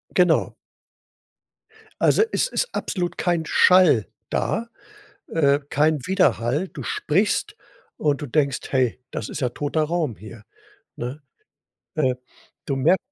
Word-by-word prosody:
Genau. - - +3 1.5
Also, - - +5
es - - +1
ist - - -1
absolut 175 -2 -3
kein 170 -3 0
Schall 180 - +5 0.2
da, 230 +1 -1 0.6
äh, 145 -3 +2
kein 150 -2 +2
Widerhall. 145 - +1
Du - - -8
sprichst 205 - 0 0.4
und 145 -2 0
du 145 - -3
denkst: 140 0 +1
„Hey, 130 -3 +1
das 105 - -4
ist 150 - -6
ja 125 - 0
toter 150 +4 -1
Raum 155 -8 -1
hier“, 110 +1 -12 0.5
ne? 130 +5 -6 0.7
Äh, 130 -6 +1 0.5
du 140 - 0
mer 135 +8 +4
150 Hz, 125 wpm, -23 LUFS, 130-175 Hz, 1.5 s, Also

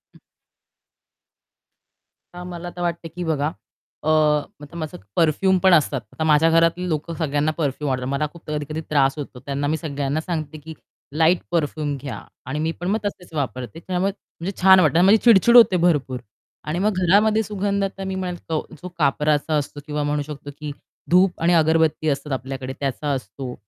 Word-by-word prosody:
हं. - - -18 2.1
तर 180 0 -8
मला 175 0 -7
तर 175 - -6
वाटते 170 -1 -2
की 175 +2 -6
बघा 155 -2 0 0.5
अ, 155 - 0
आता 150 0 0
माझं 155 -2 -5 0.2
परफ्यूम 185 +4 +3
पण 190 -1 +5
असतात. 145 -5 +3
आता 160 - -3
माझ्या 155 +1 +4
घरातली 165 +2 +2
लोकं 155 +2 -2
सगळ्यांना 150 0 0
परफ्यूम 145 -1 -1
आवडतात, 125 0 -2
मला 145 +2 0
खूप 170 - -13
कधी-कधी 150 +1 -3
त्रास 140 -1 +2
होतो 135 -3 -7
त्यांना 140 +1 -2
मी 160 +1 0
सगळ्यांना 145 -1 -2
सांगते 155 -3 -4
की 160 +2 -10 0.4
लाईट 165 +2 +4
परफ्यूम 150 -3 -1
घ्या 140 -3 -6 0.2
आणि 140 +4 -3
मी 160 +1 0
पण 175 - -4
मग 215 +3 +1
तसेच 180 -4 -6
वापरते 135 +1 -4
त्यामुळे 185 +3 -1
म्हणजे 195 -2 -8
छान 190 0 +8
वाटतं 155 -2 +3
आणि 180 - +5
माझी 210 +3 +7
चिड-चिड 235 +1 +6
होते 195 -6 +7
भरपूर 135 -6 0 0.5
आणि 165 +4 -1
मग 210 +1 +1
घरामध्ये 215 +3 +4
सुगंधता 200 -1 -2
मी 190 0 -3
म्हणेल 180 -2 -3
तो 155 -1 -1 0.2
जो 180 - -6
कापराचा 150 +1 +1
असतो 145 0 -4
किंवा 150 -1 -2
म्हणू 145 0 0
शकतो 145 -1 -8
की 150 -1 -5 0.4
धूप 180 +1 +4
आणि 175 +1 +3
अगरबत्ती 160 -1 +3
असतात 140 +1 -3
आपल्याकडे 130 0 -5
त्याचा 140 +1 -2
असतो. 130 0 -5
155 Hz, 175 wpm, -22 LUFS, 145-180 Hz, 2.1 s, छान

